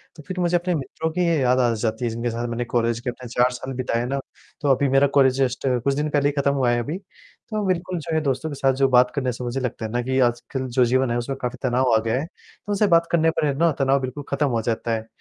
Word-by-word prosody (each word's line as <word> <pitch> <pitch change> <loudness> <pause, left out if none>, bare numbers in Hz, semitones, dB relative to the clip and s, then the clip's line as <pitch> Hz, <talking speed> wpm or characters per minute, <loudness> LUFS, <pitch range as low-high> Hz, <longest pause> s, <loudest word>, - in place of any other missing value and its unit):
तो 150 - -12
फिर 185 -1 -4
मुझे 175 0 +1
अपने 175 0 -1
मित्रों 160 +2 -3
की 180 +3 -1
ये 165 -2 +2
याद 125 0 +3
आ 120 -2 +3
जाती 110 +1 -2
है, - - 0
जिनके 115 +2 -2
साथ 120 +1 -3
मैंने 120 +1 -2
कॉलेज 115 -1 0
के 125 +1 -4
अपने 125 0 -8
4 125 +2 +2
साल 130 +1 -6
बिताए 120 -1 -1
ना, 135 +2 -2 0.4
तो 145 - -1
अभी 140 +2 +1
मेरा 135 +1 +4
कॉलेज 130 -2 +5
जस्ट 130 +1 0 0.2
कुछ 140 - +2
दिन 150 +2 -1
पहले 145 -1 +2
ही - - 0
ख़त्म 140 0 +2
हुआ 130 -3 +2
है 120 - +1
अभी, 145 +9 -3
तो 205 +2 -8
बिल्कुल 180 0 -1
जो 165 +1 -5
है 160 - +2
दोस्तों 135 +2 -1
के 145 - -5
साथ 135 -1 +2
जो 135 0 +3
बात 125 0 +5
करने 130 -3 0
से 125 +1 -7
मुझे 120 +2 -2
लगता 125 -3 -3
है 110 - -5
ना 120 +1 0
कि 130 +2 -1
आजकल 125 +2 0
जो 125 0 +2
जीवन 130 0 +1
है, 120 - 0
उसमें 135 +3 -3
काफ़ी 125 0 -3
तनाव 125 -1 +2
आ - - +4
गया 115 +3 +1
है, 150 - -3
तो 200 +3 -12
उनसे 205 +1 +2
बात 170 -2 +4
करने 165 -1 +3
पर 160 - -1
है 140 - +1
ना, 165 +2 +3
तनाव 135 -1 +2
बिल्कुल 130 +3 -5
ख़त्म 140 +1 +1
हो 115 -3 0
जाता 115 +1 -2
है। 110 0 -3
130 Hz, 290 wpm, -23 LUFS, 120-150 Hz, 0.4 s, कॉलेज